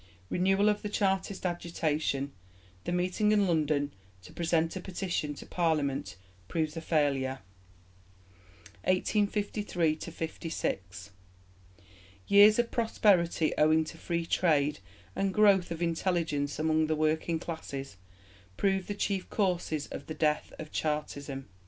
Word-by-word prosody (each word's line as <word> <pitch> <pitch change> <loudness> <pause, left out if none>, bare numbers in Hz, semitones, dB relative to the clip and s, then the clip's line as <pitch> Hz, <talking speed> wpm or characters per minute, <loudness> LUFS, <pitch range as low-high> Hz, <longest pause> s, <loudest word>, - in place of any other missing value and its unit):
Renewal 195 +3 +3
of 210 0 +2
the 210 - -4
Chartist 195 -1 0
agitation. 155 -5 -1 0.5
The - - -2
meeting 180 +4 +1
in 205 -2 +3
London 150 -4 +1 0.3
to - - -13
present 165 0 0
a - - -3
Petition 175 -5 -3
to - - -10
Parliament 145 - 0 0.3
proves 155 +2 -1
a 165 - -4
failure. 140 -5 +1 1.5
1853 200 -3 +1
56. 100 - -4 1.1
Years 205 +1 +7
of 240 -1 +1
prosperity 190 -8 +2
owing 155 +1 +5
to 155 - -9
Free 170 -1 -2
Trade 150 - +2 0.4
and 195 0 0
growth 200 -4 +5
of 170 0 -3
intelligence 165 -4 0
among 155 0 +2
the 155 - +1
working 155 +2 +1
classes 140 - -6 0.6
prove 195 -2 +1
the 205 - -3
chief 195 -2 -2
causes 180 -7 0
of - - -8
the 155 - -5
death 150 -1 0
of 155 -1 -8
Chartism. 145 -3 -3
165 Hz, 120 wpm, -30 LUFS, 150-190 Hz, 1.5 s, Years